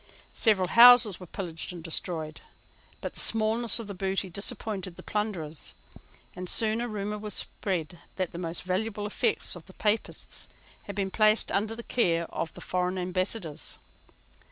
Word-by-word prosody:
Several 195 -6 +2
houses 240 -4 +7
were 180 - -10
pillaged 165 -1 -5
and 175 -2 -9
destroyed: 160 -2 -1 0.6
but - - -5
the - - -6
smallness 225 +1 +4
of 230 - -5
the 200 - -7
booty 190 0 -2
disappointed 195 -1 +3
the - - -10
plunderers; 185 -8 -3 0.6
and 180 0 -4
soon 220 0 +4
a 240 - -2
rumour 210 -1 -4
was 210 -2 -2
spread 175 -4 -3 0.2
that 185 -3 -2
the 170 - -7
most 165 -1 -4
valuable 205 +3 -2
effects 210 - 0
of 175 - -12
the 190 - -14
Papists 215 +1 -2 0.4
had 200 - -7
been 195 -1 -2
placed 215 +1 +2
under 215 +3 -1
the 235 - -8
care 170 -10 +1
of 165 - -3
the - - -11
foreign 180 0 -2
Ambassadors. 185 -2 -4
195 Hz, 160 wpm, -28 LUFS, 180-215 Hz, 0.6 s, houses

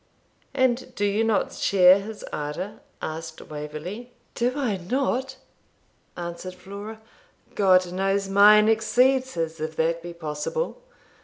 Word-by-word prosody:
'And 255 -1 +1
do 205 - 0
you 205 +2 +1
not 225 -2 +1
share 185 0 +5
his 210 +1 -8
ardour?' 150 +7 -4 0.2
asked 160 0 -5
Waverley, 155 +11 -7 0.2
'Do 245 +1 0
I 250 -9 -1
not?' 260 +6 -1 0.8
answered 175 +1 -6
Flora. 205 +4 -9 0.5
'God 185 -3 +4
knows 195 +1 0
mine 210 +2 +7
exceeds 255 +4 +2
his, 165 -1 -3
if 155 +1 -4
that 165 +1 0
be 175 0 -8
possible. 170 - -4
195 Hz, 125 wpm, -25 LUFS, 170-225 Hz, 0.8 s, mine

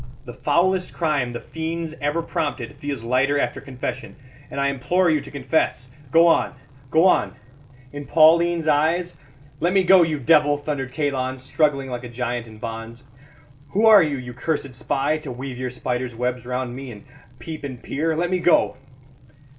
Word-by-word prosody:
The 120 - -8
foulest 180 +7 +1
crime 150 -7 0
the 120 - -5
fiends 160 0 -5
ever 145 +4 0
prompted 145 -7 -3
feels 140 -5 -4
lighter 130 +4 +2
after - - -2
confession; 130 -1 -6 0.3
and - - -5
I 140 - +2
implore 170 +7 +1
you 155 -2 +1
to 140 - -11
confess. 140 -3 -1 0.2
Go 165 +4 +5
on, 165 -4 +3 0.3
go 160 +5 +4
on 105 - +3 0.6
in 145 -1 -7
Pauline's 165 +1 +4
eyes 165 +4 +1 0.2
" 140 0 -26
"Let 175 +3 +2
me 195 -1 +4
go, 185 0 +7
you 160 -2 +1
devil!" 145 +1 +4
thundered 145 -3 -4
Kalon, 130 -2 -1
struggling 135 0 0
like 125 0 -5
a 125 - -7
giant 120 0 -3
in 110 -1 -13
bonds. 115 +2 -7 0.7
"Who 210 +3 +3
are 215 -3 +9
you, 150 -4 0
you 125 -1 -7
cursed 140 +1 -3
spy, 140 +5 -1
to 150 -4 -7
weave 125 0 -6
your 130 0 -2
spiders' 125 -1 -3
webs 125 0 -3
round 125 -1 -3
me, 135 0 -7
and 105 -3 -11 0.3
peep 155 +5 -8
and 130 -3 -6
peer? 160 +3 -1
Let 175 +2 0
me 185 - +1
go." 175 -6 +3
140 Hz, 180 wpm, -22 LUFS, 125-160 Hz, 0.7 s, are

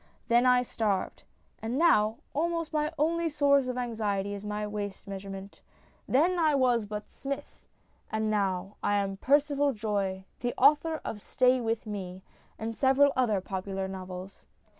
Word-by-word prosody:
Then 240 +2 +5
I 250 0 +5
starved; 210 -5 -2 0.4
and 230 +3 -2
now 220 -9 +4 0.2
almost 330 +1 -1
my 300 0 0
only 330 +2 +1
source 280 -3 +3
of 250 0 -3
anxiety 210 -5 -1
is 200 0 -6
my 210 0 -3
waist 205 -2 -5
measurement. 195 0 -8 0.5
Then 345 +7 +3
I 310 -3 +3
was 245 -5 +2
but 210 0 -5
Smith; 275 0 -7 0.4
and 220 0 0
now 195 -2 -1
I 205 - +1
am 195 -1 -1
Percival 285 +3 +2
Joye, 200 -4 -2
the 245 -1 -2
author 300 +4 +4
of 210 - -5
Stay 255 +4 +2
With 225 0 -1
Me 190 -3 -6 0.3
and 225 +1 -4
several 275 +2 +4
other 220 -7 +2
popular 190 0 -4
novels. 185 0 -8
225 Hz, 150 wpm, -29 LUFS, 200-275 Hz, 0.5 s, Then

